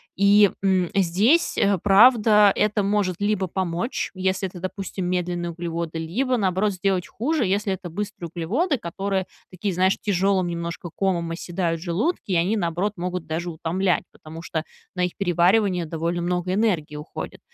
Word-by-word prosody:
И, 200 Hz, +1 st, +5 dB
м, 190 Hz, -3 st, +2 dB
здесь, 200 Hz, -, +2 dB
э, 200 Hz, -1 st, +3 dB
правда, 210 Hz, 0 st, +6 dB
это 210 Hz, 0 st, +1 dB
может 200 Hz, -2 st, +1 dB
либо 205 Hz, -2 st, 0 dB
помочь, 180 Hz, +5 st, -2 dB
если 190 Hz, 0 st, -1 dB
это, 180 Hz, -, -10 dB
допустим, 190 Hz, 0 st, -5 dB
медленные 175 Hz, -1 st, -2 dB
углеводы, 170 Hz, -1 st, -4 dB
либо, 225 Hz, +12 st, -1 dB
наоборот, 200 Hz, -1 st, +1 dB
сделать 185 Hz, -1 st, -1 dB
хуже, 285 Hz, +2 st, -1 dB
если 200 Hz, +1 st, 0 dB
это 185 Hz, -1 st, -4 dB
быстрые 180 Hz, -1 st, -5 dB
углеводы, 255 Hz, -, 0 dB
которые, 195 Hz, 0 st, -3 dB, 0.2 s
такие, 190 Hz, +2 st, -3 dB
знаешь, 185 Hz, +2 st, +2 dB
тяжелым 195 Hz, -2 st, +1 dB
немножко 170 Hz, 0 st, -5 dB
комом 175 Hz, -4 st, -1 dB
оседают 170 Hz, 0 st, -2 dB
в -, -, -9 dB
желудке. 200 Hz, -, -1 dB
И -, -, +2 dB
они, 180 Hz, +6 st, +2 dB
наоборот, 180 Hz, +2 st, -1 dB
могут 180 Hz, 0 st, -4 dB
даже 165 Hz, +2 st, -3 dB
утомлять, 175 Hz, +3 st, 0 dB
потому 160 Hz, +1 st, -11 dB
что 160 Hz, -2 st, -3 dB, 0.3 s
на 180 Hz, -1 st, 0 dB
их 180 Hz, -, -5 dB
переваривание 180 Hz, 0 st, +2 dB
довольно 165 Hz, +2 st, -2 dB
много 180 Hz, +1 st, -1 dB
энергии 180 Hz, -8 st, 0 dB
уходит. 150 Hz, -, -7 dB
185 Hz, 155 wpm, -23 LUFS, 170-200 Hz, 0.3 s, правда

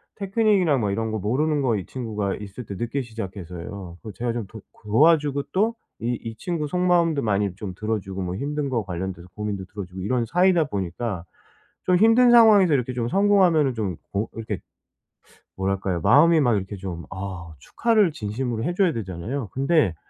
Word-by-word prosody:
테크닉이나 195 Hz, -, +2 dB
뭐 105 Hz, -4 st, 0 dB
이런 110 Hz, +2 st, -2 dB
거 110 Hz, -, -1 dB
모르는 145 Hz, +9 st, 0 dB
거 125 Hz, -4 st, +1 dB
이 95 Hz, -4 st, -4 dB
친구가 105 Hz, -6 st, -3 dB
있을 105 Hz, +3 st, -8 dB
때 100 Hz, -, -6 dB
늦게 120 Hz, +7 st, -2 dB
시작해서요 95 Hz, -5 st, -7 dB
그거 110 Hz, -, -8 dB
제가 120 Hz, +2 st, -2 dB
좀 115 Hz, -3 st, -3 dB
도 110 Hz, +2 st, -11 dB, 0.2 s
도와주고 145 Hz, +5 st, +3 dB
또 220 Hz, +5 st, +1 dB, 0.3 s
이 120 Hz, +1 st, 0 dB
이 115 Hz, -1 st, -6 dB
친구 165 Hz, -4 st, -3 dB
속마음도 170 Hz, -3 st, +2 dB
많이 100 Hz, -3 st, 0 dB
좀 95 Hz, -2 st, -6 dB
들어주고 100 Hz, -2 st, -3 dB
뭐 90 Hz, +1 st, -3 dB
힘든 145 Hz, +4 st, -2 dB
거 120 Hz, -4 st, -1 dB
관련돼서 90 Hz, -1 st, -5 dB
고민도 105 Hz, -2 st, -4 dB
들어주고 95 Hz, -1 st, -8 dB
이런 120 Hz, +4 st, 0 dB
사이다 180 Hz, +3 st, +3 dB
보니까 95 Hz, -, -4 dB, 0.6 s
좀 180 Hz, -, +4 dB
힘든 225 Hz, +4 st, +6 dB
상황에서 210 Hz, -8 st, +7 dB
이렇게 130 Hz, -1 st, 0 dB
좀 120 Hz, -1 st, -2 dB
성공하면은 185 Hz, -8 st, +4 dB
좀 100 Hz, -7 st, -3 dB, 0.2 s
어 100 Hz, +3 st, 0 dB
이렇게 110 Hz, -5 st, -4 dB, 1.0 s
뭐랄까요? 95 Hz, -2 st, -1 dB
마음이 160 Hz, -, +6 dB
막 120 Hz, -5 st, +3 dB
이렇게 95 Hz, +2 st, -5 dB
좀 90 Hz, -3 st, -6 dB
아 95 Hz, -4 st, -6 dB
축하를 215 Hz, -, +2 dB
진심으로 115 Hz, +1 st, -3 dB
해 175 Hz, -, -1 dB
줘야 185 Hz, -4 st, +3 dB
되잖아요? 105 Hz, +4 st, -4 dB
근데 135 Hz, -, +2 dB
115 Hz, 375 characters per minute, -24 LUFS, 100-155 Hz, 1.0 s, 상황에서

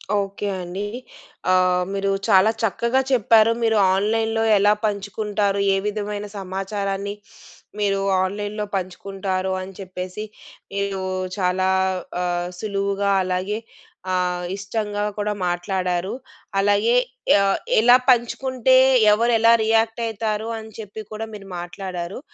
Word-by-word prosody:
Okay 200 Hz, 0 st, -2 dB
అండి. 180 Hz, +3 st, -5 dB, 0.7 s
ఆహ్, 180 Hz, -1 st, +3 dB
మీరు 195 Hz, 0 st, 0 dB, 0.2 s
చాలా 205 Hz, 0 st, +5 dB
చక్కగా 235 Hz, +4 st, +1 dB
చెప్పారు. 225 Hz, -2 st, +5 dB
మీరు 225 Hz, -1 st, +3 dB, 0.2 s
ఆన్‌లైన్‌లో 225 Hz, +3 st, +1 dB
ఎలా 205 Hz, +1 st, +4 dB
పంచుకుంటారు? 205 Hz, 0 st, -1 dB, 0.2 s
ఏ -, -, +1 dB
విధమైన 210 Hz, 0 st, -3 dB
సమాచారాన్ని 195 Hz, +1 st, -3 dB, 0.7 s
మీరు 200 Hz, -1 st, +1 dB, 0.2 s
ఆన్‌లైన్‌లో 205 Hz, +2 st, -3 dB
పంచుకుంటారు 190 Hz, 0 st, -3 dB
అని 190 Hz, +1 st, -8 dB
చెప్పేసి, 185 Hz, +1 st, -6 dB, 0.5 s
మీరు 200 Hz, -1 st, -2 dB, 0.4 s
చాలా 185 Hz, 0 st, +1 dB, 0.5 s
ఆహ్, 175 Hz, 0 st, -1 dB
సులువుగా 200 Hz, -1 st, -1 dB
అలాగే 185 Hz, +3 st, -2 dB, 0.6 s
ఆహ్, 180 Hz, -1 st, 0 dB
ఇష్టంగా 205 Hz, +1 st, -3 dB
కూడా 210 Hz, 0 st, -1 dB
మాట్లాడారు. 180 Hz, +1 st, -1 dB, 0.5 s
అలాగే 205 Hz, +4 st, +3 dB, 0.5 s
ఆహ్, 195 Hz, 0 st, +2 dB, 0.2 s
ఎలా 245 Hz, +3 st, +7 dB
పంచుకుంటే 255 Hz, +1 st, +3 dB, 0.4 s
ఎవరెలా 230 Hz, +1 st, +4 dB
రియాక్ట్ 225 Hz, +1 st, +2 dB
అయితారు? 220 Hz, 0 st, -2 dB
అని 220 Hz, 0 st, -11 dB
చెప్పి 215 Hz, 0 st, -7 dB
కూడా 220 Hz, +1 st, -5 dB
మీరు 195 Hz, -2 st, -10 dB
మాట్లాడారు. 175 Hz, +1 st, -6 dB
200 Hz, 105 wpm, -22 LUFS, 190-215 Hz, 0.7 s, ఎలా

